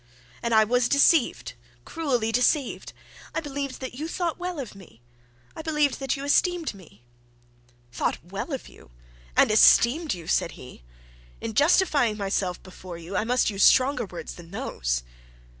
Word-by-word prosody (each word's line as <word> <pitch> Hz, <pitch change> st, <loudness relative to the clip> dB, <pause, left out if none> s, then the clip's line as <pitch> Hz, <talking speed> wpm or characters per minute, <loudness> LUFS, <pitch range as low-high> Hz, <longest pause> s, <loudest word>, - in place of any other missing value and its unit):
And 235 Hz, -, -2 dB
I 220 Hz, -, +7 dB
was 245 Hz, +2 st, +1 dB
deceived, 280 Hz, 0 st, +3 dB, 0.3 s
cruelly 255 Hz, -9 st, -1 dB
deceived. 250 Hz, +3 st, 0 dB, 0.4 s
I -, -, +1 dB
believed 280 Hz, -3 st, -5 dB
that 260 Hz, -, -5 dB
you 300 Hz, +6 st, -5 dB
thought 340 Hz, 0 st, -3 dB
well 355 Hz, -2 st, -4 dB
of 255 Hz, -6 st, -6 dB
me; 190 Hz, -, -16 dB, 0.6 s
I -, -, -6 dB
believed 300 Hz, -3 st, 0 dB
that 270 Hz, 0 st, -2 dB
you 275 Hz, -, -6 dB
esteemed 340 Hz, +1 st, +1 dB
me.' 155 Hz, -, -17 dB, 0.9 s
'Thought -, -, -1 dB, 0.3 s
of 270 Hz, -4 st, -5 dB
you -, -, -16 dB
well -, -, -25 dB, 0.5 s
and -, -, +5 dB
esteemed 250 Hz, -, +5 dB
you!' 170 Hz, -2 st, -10 dB
said 170 Hz, -, 0 dB
he. 125 Hz, -, -13 dB, 0.6 s
'In 225 Hz, -, -5 dB
justifying 285 Hz, -, +3 dB
myself 195 Hz, -3 st, -2 dB
before 185 Hz, -1 st, -10 dB
you, 170 Hz, +3 st, -8 dB
I 215 Hz, -, 0 dB
must 245 Hz, -1 st, +1 dB
use 200 Hz, 0 st, -4 dB
stronger 255 Hz, -3 st, +4 dB
words 175 Hz, -, -8 dB
than 170 Hz, -1 st, -13 dB
those.' -, -, -3 dB
245 Hz, 160 wpm, -25 LUFS, 195-290 Hz, 0.9 s, I